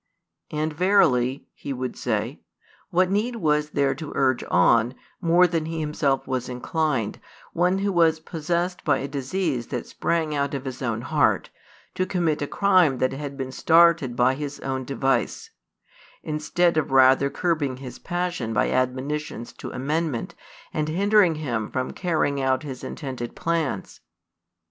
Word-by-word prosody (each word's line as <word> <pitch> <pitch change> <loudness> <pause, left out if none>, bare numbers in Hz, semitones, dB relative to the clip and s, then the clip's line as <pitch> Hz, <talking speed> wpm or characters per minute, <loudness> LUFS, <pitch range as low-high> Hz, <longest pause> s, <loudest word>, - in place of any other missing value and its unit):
And 155 0 -2
verily," 140 -8 +3
he 140 - -6
would 130 -1 -4
say, 115 +3 -2 0.5
"what 185 0 +2
need 220 +5 0
was 150 -7 +1
there 140 -2 +1
to 155 -3 -7
urge 130 -2 +2
on, 115 +7 +4 0.3
more 175 +1 +5
than 165 -2 0
he 165 0 -3
himself 150 -3 0
was 130 -2 -3
inclined, 125 -2 -1 0.3
one 180 +2 +2
who 200 +1 0
was 165 -3 +3
possessed 170 +3 -2
by 145 - +3
a 135 - -4
disease 140 -2 -2
that 125 -3 -4
sprang 160 -2 -1
out 140 -1 -1
of 135 0 -5
his 130 0 -6
own 115 -3 -1
heart, - - +1 0.4
to 185 - -1
commit 170 -5 0
a 145 - -1
crime 185 -9 +3
that 130 0 +1
had 140 0 -6
been 130 -1 -4
started 165 -3 +4
by 125 +2 +3
his 145 +1 -5
own 130 -1 -3
device; 135 0 -1 0.7
instead 155 +2 +1
of 155 - +1
rather 135 +1 +5
curbing 150 -6 -1
his 130 -2 -9
passion 175 -10 -2
by 105 - +1
admonitions 130 0 -2
to - - -8
amendment, 145 0 -2 0.4
and 155 0 -1
hindering 195 0 +4
him 120 -8 -3
from 130 0 -2
carrying 155 -6 0
out 130 +1 +1
his 135 -4 -7
intended 130 -5 -6
plans?" 165 -3 -2
145 Hz, 155 wpm, -24 LUFS, 130-170 Hz, 0.7 s, more